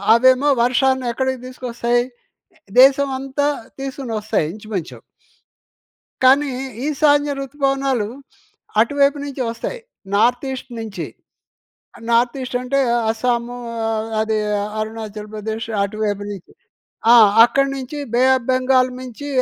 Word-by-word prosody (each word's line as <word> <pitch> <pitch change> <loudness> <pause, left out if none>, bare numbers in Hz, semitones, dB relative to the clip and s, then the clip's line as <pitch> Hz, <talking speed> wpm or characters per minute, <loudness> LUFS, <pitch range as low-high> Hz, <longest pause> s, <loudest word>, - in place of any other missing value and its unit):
అవేమో 260 +4 +4
వర్షాన్ని 260 +1 +2
ఎక్కడికి 260 +1 -1
తీసుకొస్తాయి? 240 -1 -1 0.8
దేశమంతా 270 +1 +3 0.3
తీసుకొని 270 -3 -5
వస్తాయి 210 -7 0
ఇంచుమించు... 210 -5 -6 1.2
కానీ 275 +3 +5 0.4
ఈశాన్య 290 -1 +3
ఋతుపవనాలు, 275 -4 -1 0.7
అటువైపు 280 +4 +2
నుంచి 275 -2 -5
వస్తాయి - - -5 0.3
నార్త్ 245 +6 +2
ఈస్ట్ 260 -1 -7
నించి. 205 -6 -5 1.0
నార్త్ 235 +2 +3
ఈస్టంటే, 255 +2 -1 0.3
అస్సాము 235 +1 -1 0.3
ఆహ్, 220 0 -2
అదీ 220 0 0 0.4
అరుణాచల్‍ప్రదేశ్ 215 0 -5 0.2
అటువైపు 205 0 -2
నుంచి. 195 -4 -10 0.6
ఆ! - - +9 0.3
అక్కడ 275 +3 +2
నుంచి 270 +2 -6 0.2
బే 245 - +3
ఆఫ్ 255 -3 -2
బెంగాల్ 255 0 +3
మీంచి 255 +3 -8
250 Hz, 100 wpm, -20 LUFS, 220-270 Hz, 1.2 s, ఆ